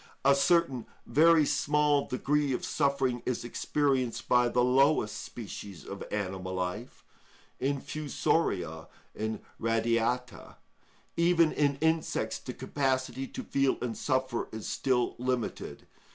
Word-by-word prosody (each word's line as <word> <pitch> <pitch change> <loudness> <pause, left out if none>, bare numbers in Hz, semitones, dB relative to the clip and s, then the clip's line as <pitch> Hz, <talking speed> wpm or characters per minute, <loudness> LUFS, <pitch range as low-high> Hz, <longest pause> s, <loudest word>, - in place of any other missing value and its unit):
A 140 - +7
certain 140 -3 +2 0.2
very 155 +4 +5
small 145 0 +2
degree 145 +2 0
of - - -2
suffering 135 -4 0
is 125 -1 -2
experienced 130 -1 0
by 125 -1 +4
the 125 +1 +2
lowest 130 -3 +3
species 100 -7 -8
of 100 - -7
animal 95 -2 -3
life—infusoria 120 - -3 0.3
and 110 0 -3 0.2
radiata; 115 +1 -1 0.6
even 170 -1 +4
in 145 -1 +1
insects 160 0 0
the - - -7
capacity 130 -1 -1
to - - -7
feel 135 -1 +1
and 120 -2 -3
suffer 130 -3 -1
is 110 -1 -6
still 125 -2 0
limited. 125 -2 -3
130 Hz, 110 wpm, -29 LUFS, 115-145 Hz, 0.6 s, A